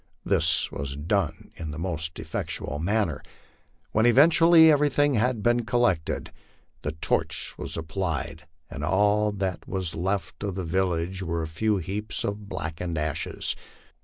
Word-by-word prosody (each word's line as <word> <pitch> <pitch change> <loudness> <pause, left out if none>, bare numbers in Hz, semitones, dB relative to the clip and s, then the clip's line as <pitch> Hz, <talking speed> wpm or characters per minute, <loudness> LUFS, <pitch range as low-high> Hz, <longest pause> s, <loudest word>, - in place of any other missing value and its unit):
This 80 -5 +2
was 70 0 -5
done 85 +3 -1
in 80 - -5
the 75 - -6
most 80 -2 -3
effectual 75 - -4
manner. 90 -3 0 0.7
When 110 +2 +3
everything 150 0 +6
had 120 -1 +1
been 120 0 +3
collected 110 -9 0 0.5
the 75 - -3
torch 80 - -1
was - - -5
applied, 80 -2 -3 0.2
and 75 -2 -7
all 105 +5 +3
that 95 -3 -3
was 95 -4 -3
left 95 +4 -2
of 100 -3 -2
the 95 -2 -3
village 90 +1 -1
were 85 -2 -2
a - - -3
few 105 +7 0
heaps 100 +4 -3
of 100 0 -4
blackened 85 -1 -4
ashes. 75 -1 -2
95 Hz, 135 wpm, -26 LUFS, 80-105 Hz, 0.7 s, everything